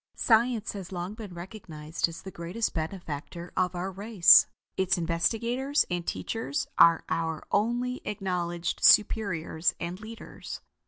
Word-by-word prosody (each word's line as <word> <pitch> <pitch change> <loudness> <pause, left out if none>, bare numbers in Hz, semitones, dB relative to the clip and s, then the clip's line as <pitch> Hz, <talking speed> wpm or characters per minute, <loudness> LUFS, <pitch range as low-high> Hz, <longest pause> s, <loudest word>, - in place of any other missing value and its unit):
Science 230 -1 +2
has 195 -3 -8
long 180 +2 -4
been 215 -3 -9
recognized 170 -4 -4
as 165 - -10
the 190 - -8
greatest 175 +7 -3
benefactor 170 0 -6
of 180 -1 0
our 185 +2 -3
race. 200 -1 +6 0.3
Its 190 -1 +1
investigators 230 - 0
and 175 -1 -2
teachers 225 -11 -3
are 165 -1 +6
our 160 -1 -2
only 240 +4 0
acknowledged 180 -4 -3
superiors 185 -6 +3
and 175 +2 -5
leaders. 225 +1 -9
185 Hz, 125 wpm, -28 LUFS, 170-220 Hz, 0.3 s, race